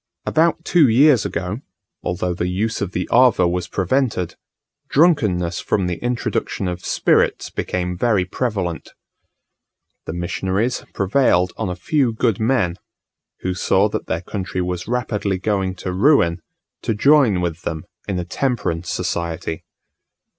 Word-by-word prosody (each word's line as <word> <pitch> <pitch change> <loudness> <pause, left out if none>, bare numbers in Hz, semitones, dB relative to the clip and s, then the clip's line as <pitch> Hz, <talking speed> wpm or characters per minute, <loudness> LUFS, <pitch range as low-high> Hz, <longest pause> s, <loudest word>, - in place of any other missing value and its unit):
About 165 +1 +2
two 170 -5 +5
years 130 0 +5
ago, 95 +5 -3 0.4
although 90 0 -2
the 90 0 -2
use 105 +5 -1
of 100 -2 -2
the 90 -1 -2
ava 120 -7 +5
was 90 0 -2
prevented, 95 -3 0 0.5
drunkenness 105 - +2
from 95 - 0
the 90 +2 -3
introduction 120 -5 -2
of 90 0 -4
spirits - - +1
became 90 0 -2
very 105 -6 +2
prevalent. 95 -5 -3 1.1
The - - -4
missionaries 95 +7 -1
prevailed 95 -3 +2
on 110 -4 -3
a 90 - -3
few 125 - +1
good 110 -2 0
men, 110 -7 +1 0.6
who 90 - -1
saw 95 +3 +2
that - - -4
their 80 - -1
country 95 0 -4
was 90 -1 -3
rapidly 105 -5 -1
going 95 -1 -1
to 90 0 -5
ruin, 90 - +3 0.4
to 110 - -1
join 135 -5 +4
with 85 -1 -2
them 80 -2 -4 0.2
in 95 - -1
a 90 - -3
Temperance 90 -6 -2
Society. 85 -1 -3
95 Hz, 140 wpm, -20 LUFS, 90-120 Hz, 1.1 s, two